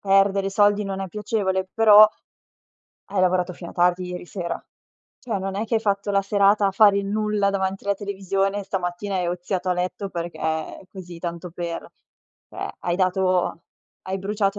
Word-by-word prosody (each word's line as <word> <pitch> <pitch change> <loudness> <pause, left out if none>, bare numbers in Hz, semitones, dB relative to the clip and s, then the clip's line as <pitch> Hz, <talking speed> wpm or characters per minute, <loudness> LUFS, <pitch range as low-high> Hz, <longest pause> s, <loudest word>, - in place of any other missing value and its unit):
perdere 195 0 +3
soldi 205 +1 +3
non 195 -1 -4
è 190 - -4
piacevole, 190 -2 -1
però 215 -1 +8 1.0
hai 195 -1 -1
lavorato 180 0 +2
fino 170 -1 -9
a - - -12
tardi 180 +1 +2
ieri 180 0 -6
sera. 175 -2 -4 0.6
Cioè 225 -5 -3
non 190 0 -4
è 215 - -1
che 230 - -2
hai - - 0
fatto 200 -1 0
la 200 0 +3
serata 200 +1 +3
a 195 - 0
fare 200 0 +5
il 200 - -3
nulla 210 -1 0
davanti 195 0 -2
alla 200 - +1
televisione 195 0 -1
e - - -8
stamattina 190 +1 -3
hai 180 -1 0
oziato 180 +1 -3
a - - +2
letto 180 +3 -3
perché 160 0 -4
così 180 -3 -9
tanto 170 0 -5
per. 170 -1 -5 0.6
Cioè - - -5
hai 175 0 -1
dato 185 -2 +1 0.4
hai 190 +1 -2
bruciato 200 +1 -1
195 Hz, 175 wpm, -23 LUFS, 180-200 Hz, 1.0 s, però